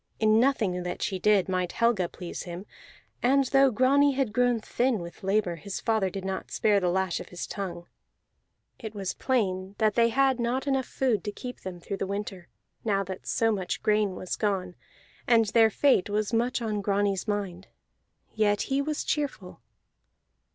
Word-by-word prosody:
In 215 0 +4
nothing 225 -9 +1
that 180 0 -4
she 190 -2 -2
did 205 -1 +3
might 185 -2 -1
Helga 230 -7 +2
please 175 - -7
him; 175 +2 -7 0.6
and 270 +2 +3
though 270 +1 +4
Grani 275 +4 +3
had 260 -5 -1
grown 245 -1 +2
thin 245 +2 0
with 170 -2 -9
labor, 195 -3 0
his 190 +5 -6
father 220 -4 +1
did 190 0 -6
not 190 0 -4
spare 210 -2 +2
the 180 -2 0
lash 190 0 0
of - - -9
his 180 - -5
tongue. 175 -4 -5 0.9
It 220 -2 -7
was 195 -2 -3
plain 195 -6 -1
that 215 -2 +2
they 230 +1 +4
had 265 +1 +2
not 245 +3 -1
enough 270 -2 0
food 250 -6 0
to 205 - -2
keep 250 +4 -8
them 185 -2 -7
through 195 +3 -5
the 195 - -3
winter, 200 -3 -5 0.4
now 200 -3 +1
that 190 0 -8
so 225 -2 +2
much 190 -4 -3
grain 210 -3 +2
was 185 - -4
gone, 190 -4 -1 0.5
and 230 -2 +5
their 225 0 +5
fate 255 -3 +2
was 210 +1 -1
much 240 +1 0
on 210 -2 -1
Grani's 200 0 0
mind; 195 -3 -3 0.7
yet 205 -1 +2
he 275 - +2
was 300 +1 -2
cheerful. 270 -11 -3
210 Hz, 180 wpm, -27 LUFS, 190-240 Hz, 0.9 s, and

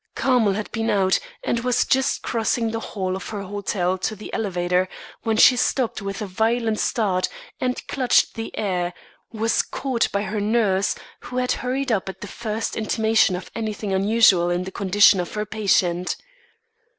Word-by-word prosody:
Carmel 245 -6 +3
had 210 +2 -4
been 225 0 -1
out 190 -2 +3 0.2
and 235 - 0
was 245 0 +1
just 265 +1 +1
crossing 230 0 0
the 225 - -2
hall 190 -4 -3
of 190 - -6
her 205 -2 -5
hotel 190 -2 -2
to 215 +4 -2
the 210 - -10
elevator, 180 -3 0 0.3
when 225 -2 0
she 250 - +7
stopped 245 -2 0
with 195 +2 -4
a - - -3
violent 220 +3 0
start 190 -5 0 0.3
and 250 0 -2
clutching 255 -3 +2
the 225 -1 -6
air, 180 -4 -1 0.4
was 225 0 +1
caught 260 -4 -1
by 200 0 0
her 210 +1 -3
nurse 205 -3 +1 0.2
who 250 - -7
had 250 0 +1
hurried 260 +1 -1
up 195 -3 0
at 190 - -9
the 210 - -6
first 220 +2 -4
intimation 220 -3 +2
of 180 - -8
anything 215 -3 -3
unusual 195 -3 +4
in 175 +1 0
the 190 - -7
condition 200 0 +4
of 175 - -3
her 210 0 -1
patient. 185 -4 +1
210 Hz, 175 wpm, -23 LUFS, 190-230 Hz, 0.4 s, she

